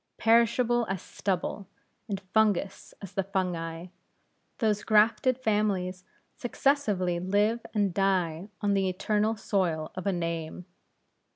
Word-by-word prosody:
Perishable 235 +1 +3
as 190 -1 -1
stubble, 195 +2 -3 0.4
and 195 -2 -2
fungous 200 0 0
as 195 - -8
the 195 - +1
fungi, 180 -3 -3 0.7
those 215 -4 +1
grafted 220 +3 +3
families 205 -6 0 0.3
successively 215 -9 0
live 205 +5 +1
and 200 -3 +1
die 185 -2 0
on 205 -1 +2
the 195 -1 +2
eternal 210 +4 0
soil 170 -7 -1
of 185 +2 -5
a - - +3
name. 170 -1 -4
195 Hz, 115 wpm, -28 LUFS, 180-215 Hz, 0.7 s, Perishable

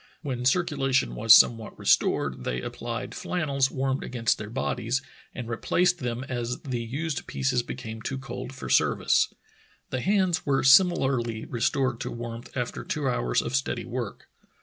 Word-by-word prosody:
When 125 -4 -3
circulation 135 -3 +1
was 110 +1 +2
somewhat 115 -1 +6
restored - - +1
they 60 - -2
applied - - -5
flannels 140 -6 0
warmed 135 0 -1
against 120 -3 0
their 105 -1 -6
bodies, 125 +1 -1 0.3
and 125 -3 -5
replaced 175 +9 +1
them 125 -1 -3
as 125 -2 -3
the 125 -3 -3
used 140 +4 -4
pieces 130 -2 0
became 115 -2 -7
too 130 - -3
cold 135 -1 -6
for 135 -1 -8
service. - - +3 0.6
The 130 - -1
hands 190 -1 +2
were 135 -1 +1
similarly 135 - +4
restored 125 +1 0
to - - -4
warmth 115 0 -7
after - - -3
two - - -2
hours - - +1
of 130 - -2
steady 135 -3 -1
work. 120 -3 -5
130 Hz, 150 wpm, -26 LUFS, 115-135 Hz, 0.6 s, somewhat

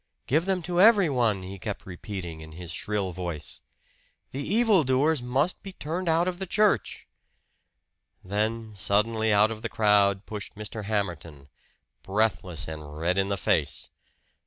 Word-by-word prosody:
"Give 155 +6 +2
them 190 -2 0
to 175 +1 +1
everyone!" 140 - +4
he 95 +1 -8
kept 105 +2 -5
repeating 90 -3 -7
in 80 0 -11
his 85 +1 -8
shrill 100 +1 -2
voice. 85 -4 -5 0.7
"The 135 - -4
evil 210 +2 +3
doers 135 +3 +2
must 135 +8 0
be 195 - -9
turned 170 +2 -3
out 165 +2 +3
of 180 -1 -2
the 190 - -4
church!" 205 - +1 1.2
Then 110 +3 -2
suddenly 110 +3 +1
out 105 +2 +4
of 110 -1 -6
the - - -3
crowd 100 -2 +3
pushed 105 +1 -7
Mr. 105 0 -6
Hamerton, 85 -9 -3 0.5
breathless 95 -5 -1
and 75 -1 -8
red 90 +4 +1
in 95 0 +1
the 100 - 0
face. - - 0
105 Hz, 150 wpm, -27 LUFS, 95-150 Hz, 1.2 s, everyone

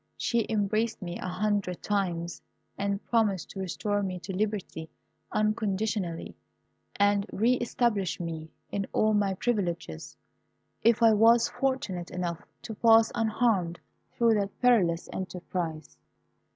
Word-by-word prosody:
She 235 -2 0
embraced 215 +1 0
me 175 0 -5
a - - -4
hundred 190 -1 -1
times, 175 -5 -1 0.3
and 200 0 -2
promised 210 -7 +1
to 195 - -8
restore 205 +3 -1
me 185 -2 -3
to 190 +2 -5
liberty 200 -6 -3 0.4
unconditionally, 215 -4 -1 0.6
and 205 0 +2
re 230 +5 +3
establish 230 -5 0
me 160 -2 -5 0.2
in 200 -1 -2
all 215 0 +3
my 200 -2 +1
privileges, 175 - -2 0.6
if 230 0 +4
I 225 -1 +7
was 230 +2 +5
fortunate 220 -10 -2
enough 175 -2 -3 0.2
to 225 - -6
pass 225 +1 +5
unharmed 215 -6 +1 0.4
through 230 -1 +4
that 200 -1 -4
perilous 190 -9 +3
enterprise. 175 -4 -5
200 Hz, 125 wpm, -28 LUFS, 180-220 Hz, 0.6 s, I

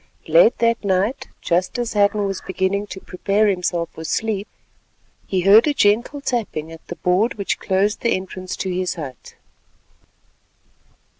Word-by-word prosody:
Late - - +5
that 230 -1 +1
night, 200 +5 0
just 180 +6 0
as 240 -1 -2
Hadden 205 0 +2
was 195 -1 -3
beginning 190 +2 -1
to 190 - -8
prepare 200 +3 0
himself 180 -4 0
for 160 - -8
sleep, 210 +3 -2 0.8
he 190 -2 0
heard 205 - +6
a 295 - +1
gentle 235 +7 +2
tapping 205 - -3
at 165 0 -13
the 175 - -6
board 185 +8 +1
which 200 -3 -2
closed 195 +3 0
the 235 - +2
entrance 185 0 -6
to 190 - -3
his 180 0 -2
hut. 140 -6 -9
200 Hz, 150 wpm, -21 LUFS, 185-220 Hz, 0.8 s, heard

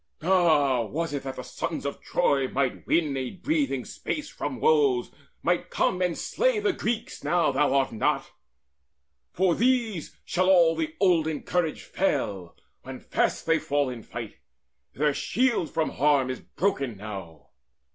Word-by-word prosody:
All, 155 - +3
was 165 +3 -2
it 140 - -2
that 135 -1 -6
the - - -6
sons - - -4
Of - - -4
Troy 135 -2 +1
might 135 0 -2
win 155 -5 +2
a 130 -2 -2
breathing 290 - -1
space 300 -1 -4
from - - -5
woes, 435 -5 +3 0.3
Might - - 0
come 180 - 0
and 180 -2 0
slay - - +1
the 415 -3 +1
Greeks, 230 -5 -3
now 170 -4 +2
thou 140 0 +2
art 135 -1 +2
not? 110 - 0 1.0
From 180 -2 +1
these 235 - 0
shall 185 +1 +1
all 170 -3 +6
the 160 -1 -3
olden 165 -5 +2
courage 175 -3 -1
fail 100 - -2 0.3
When - - -8
fast - - -1
they 165 0 +3
fall 145 -3 0
in 120 -2 -7
fight. 115 -1 -8 0.6
Their 150 +1 +2
shield 235 - +1
from 160 -1 -1
harm 140 -2 +2
Is 130 - -5
broken 140 - -2
now! 90 -9 -8
160 Hz, 155 wpm, -26 LUFS, 135-190 Hz, 1.0 s, all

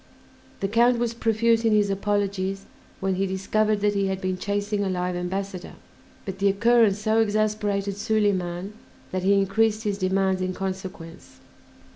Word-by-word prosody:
The 195 - +1
Count 235 +4 +3
was 235 -1 -1
profuse 230 0 +2
in 225 -1 +3
his 205 -1 +3
apologies 195 -1 -1 0.4
when 190 0 0
he 195 +1 0
discovered 210 +2 0
that 205 0 +2
he 200 -1 0
had 190 0 -2
been 185 -1 -2
chasing 205 +2 -2
a 195 - -1
live 180 -1 -2
ambassador; 185 +1 -4 0.5
but 195 -2 -6
the 200 - +3
occurrence 220 0 +4
so 215 +1 +1
exasperated 210 -2 0
Soliman 200 -3 -1 0.4
that 185 - -2
he 195 +2 +3
increased 215 +3 +1
his 205 -2 -2
demands 190 0 +1
in 185 0 -2
consequence. 190 -3 -7
200 Hz, 155 wpm, -25 LUFS, 190-215 Hz, 0.5 s, occurrence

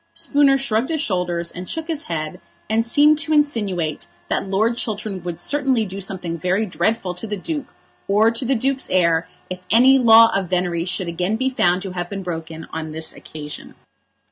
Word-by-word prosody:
Spooner 280 -2 +3
shrugged 250 -2 0
his 320 -1 -1
shoulders, 175 - -1
and 180 +1 -8
shook 320 0 -3
his 315 -3 -3
head, 160 +1 -4 0.3
and 220 +2 +2
seemed 295 +5 +4
to 315 0 -1
insinuate 205 - 0 0.2
that 195 - -1
Lord 220 +5 +1
Chiltern 210 -4 -4
would 175 -1 -5
certainly 270 -6 +1
do 195 0 -6
something 180 -3 -4
very 190 +6 +1
dreadful 180 +2 -1
to 180 +6 -6
the 210 -1 -3
Duke 295 - -4 0.4
or 215 +3 +4
to 230 +3 -1
the 265 +2 +1
Duke's 265 +3 0
heir 170 -2 +2 0.2
if 185 0 -6
any 260 +5 +6
law 230 -2 +7
of 190 -3 -1
venery 175 -2 0
should 185 0 -2
again 180 +5 -1
be 260 +3 0
found 180 -6 +2
to 190 - -5
have 175 -1 -4
been 195 -1 -5
broken 160 -2 -6
on 160 -1 -4
this 160 0 -5
occasion. 150 -1 -10
195 Hz, 190 wpm, -21 LUFS, 175-240 Hz, 0.4 s, law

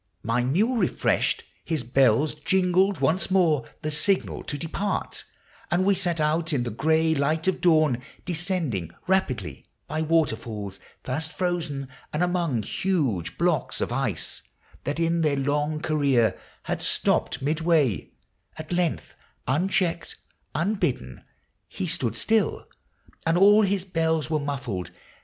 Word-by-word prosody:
My 115 +3 +1
mule 205 - +2
refreshed, - - +1 0.2
his 160 -6 -2
bells 130 +3 +3
Jingled 185 +5 +2
once 180 +5 +2
more, 165 -9 +2
the 155 - -1
signal 185 +6 0
to 145 - -3
depart, 170 +7 -3 0.4
And 180 +2 +2
we 200 - +5
set 175 -3 -1
out 160 +2 +1
in 130 -4 +1
the 120 - -3
gray 160 +7 +2
light 155 +3 0
of 190 - +1
dawn, 155 -7 +4 0.2
Descending 165 - -1 0.2
rapidly, 185 -10 -1
— - - -48
by 155 +2 -2
waterfalls 110 - -1 0.2
Fast 155 +5 -3
frozen, 170 -7 -2 0.2
and 150 +4 0
among 170 -10 0
huge 140 - -1
blocks - - 0
of - - -1
ice - - -2 0.4
That 145 +4 -2
in 165 0 +1
their 150 -3 +2
long 145 +2 0
career 140 -7 +2 0.3
had - - -3
stopt - - +1
midway; 155 - +1 0.5
At 155 +1 -8
length, 175 -2 -1 0.3
unchecked, 175 - 0 0.4
unbidden, 155 - -1 0.4
he - - -4
stood 120 - -1
still, 220 - +1 0.6
And 165 +1 +3
all 205 +3 +7
his 195 -2 0
bells 160 -3 0
were 155 - +2
muffled. 130 - -3
160 Hz, 135 wpm, -25 LUFS, 135-180 Hz, 0.6 s, all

